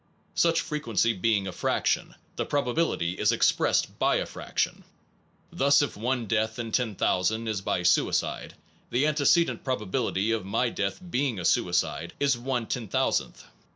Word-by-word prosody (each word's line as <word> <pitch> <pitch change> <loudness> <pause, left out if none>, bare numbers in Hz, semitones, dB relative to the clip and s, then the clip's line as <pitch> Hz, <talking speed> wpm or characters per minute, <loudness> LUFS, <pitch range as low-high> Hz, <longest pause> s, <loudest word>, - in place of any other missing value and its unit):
Such 165 -1 +3
fre 150 - -3
quency 115 -6 0
being 105 -3 +2
a 95 - -4
fraction, - - -1 0.2
the - - -1
probability 140 - 0
is 105 +1 +3
expressed 115 - +1
by - - +3
a - - 0
fraction. - - -3 0.7
Thus, 140 +2 +4
if 145 - -3
one 120 +2 -1
death 110 +1 0
in 115 -2 -4
10,000 110 -1 0
is 105 -3 -2
by 90 - -1
suicide, 90 - +1 0.3
the 130 +4 +1
antecedent 155 +3 +2
probability 110 -3 -1
of 115 -3 -1
my 100 +6 0
death 100 -3 -3
being 135 - -1
a 85 - -4
suicide 90 -1 +1
is 140 -2 +3
l 120 - -11
10,000th. 120 -3 -1
115 Hz, 150 wpm, -27 LUFS, 105-135 Hz, 0.7 s, Thus